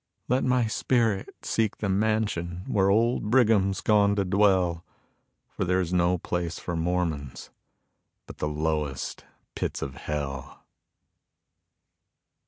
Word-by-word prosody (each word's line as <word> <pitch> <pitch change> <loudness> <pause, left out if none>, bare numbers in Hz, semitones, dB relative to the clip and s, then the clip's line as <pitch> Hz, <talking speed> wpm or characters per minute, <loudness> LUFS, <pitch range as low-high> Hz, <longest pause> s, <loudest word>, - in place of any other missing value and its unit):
Let 125 +2 +1
my 125 -2 +2
spirit 110 -2 0
seek 110 -2 0
the 105 - -2
mansion 95 -4 0
where 95 -1 +2
old 110 +1 +2
Brigham's 105 -6 +3
gone 100 -1 +3
to 100 -1 0
dwell, 95 -3 +2 0.6
For - - -4
there's 90 -1 0
no 90 0 +3
place 85 -1 -3
for 85 - -4
Mormons 80 -5 -2 0.7
but - - -12
the - - -1
lowest 75 -3 -2 0.3
pits - - -3
of 70 - -5
hell. 70 -2 -5
95 Hz, 115 wpm, -26 LUFS, 85-105 Hz, 0.7 s, Brigham's